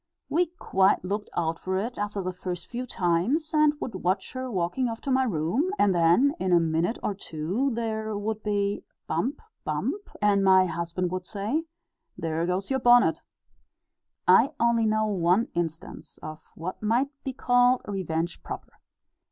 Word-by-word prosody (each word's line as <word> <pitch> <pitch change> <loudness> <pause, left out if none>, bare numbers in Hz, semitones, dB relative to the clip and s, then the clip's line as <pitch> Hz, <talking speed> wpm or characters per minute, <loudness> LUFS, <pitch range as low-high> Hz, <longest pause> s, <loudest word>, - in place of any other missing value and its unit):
We 350 +3 +2
quite 190 0 +2
looked 205 +3 -3
out 165 -1 0
for 185 0 -2
it 230 +6 -3
after 205 -1 -2
the 185 0 -3
first 180 -1 -5
few 250 +1 -5
times, 205 - 0
and 305 -1 +4
would 230 - -4
watch 185 +1 -1
her 255 0 -4
walking 195 +5 -1
off 225 0 -5
to 275 - -3
my 260 0 +3
room, 215 - 0
and 205 - +4
then 175 +12 +4
in 185 - 0
a 175 - +6
minute 165 +6 0
or 205 - 0
two 190 - -2
there 220 -2 -2
would 215 +1 -3
be 205 -1 -1 0.2
'bump, 245 - -2 0.2
bump,' 410 0 -3
and 205 -1 +3
my 190 -1 +6
husband 170 +1 -2
would 185 -1 -4
say, 225 +11 -2 0.5
'There 165 +1 -1
goes 185 +6 -2
your 265 - +2
bonnet!'" 245 0 +5
(See - - -23
Note - - -42 1.0
V, - - +8
Addenda.) - - +5
I - - -34
only 230 -1 +2
know 215 0 +2
one 190 +1 +2
instance 165 -2 -5
of 155 0 -9
what 175 +3 -6
might 235 +6 +2
be 265 - -3
called 245 0 +3
revenge 175 -4 -2
proper. - - -8
200 Hz, 175 wpm, -26 LUFS, 175-240 Hz, 1.0 s, V